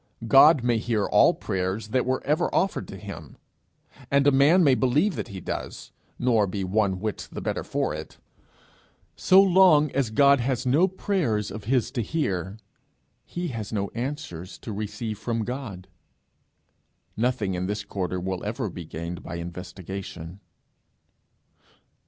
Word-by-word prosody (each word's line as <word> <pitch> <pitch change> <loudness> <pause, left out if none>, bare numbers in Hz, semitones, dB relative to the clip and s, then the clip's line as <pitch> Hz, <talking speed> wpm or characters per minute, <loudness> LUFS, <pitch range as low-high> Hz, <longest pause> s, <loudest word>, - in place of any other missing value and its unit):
God 135 +2 +7
may 120 -2 +2
hear 110 -3 0
all - - +4
prayers 95 +3 -3
that 125 +2 0 0.2
ever 150 +3 +2
were - - -3
offered 195 - 0
to - - -9
him, - - -10 0.7
and 140 0 +3
a 145 - +6
man 145 +7 +5
may 140 -4 +5
believe 140 +11 +2
that - - -4
he 100 -4 -8
does, - - -6 0.3
nor 115 -5 +2
be 95 +1 -3
one 95 0 0
whit 110 +1 -4
the - - -6
better - - -3
for - - -2
it, - - -8 1.0
so 185 - +5
long 180 -6 +5
as 135 -4 0
God 140 +4 +5
has 125 +1 -1
no 145 +9 +4
prayers 175 - -1
of 110 0 -8
his 125 0 +1
to 125 - -2
hear, 100 - -2 0.7
he 175 -5 -4 0.2
no 100 -2 -2
answers 120 - -5
to 110 - -7
receive 105 +1 -5
from 115 -1 -2
God. 115 -8 -6 1.3
Nothing 110 -4 0
in 90 0 -2
this 105 0 -3
quarter 95 -2 -3
will 95 0 -4
ever 105 -1 -3
be 85 -1 -8
gained 85 +3 -6
by 85 - -7
investigation. 90 0 -7
110 Hz, 150 wpm, -25 LUFS, 95-140 Hz, 1.3 s, God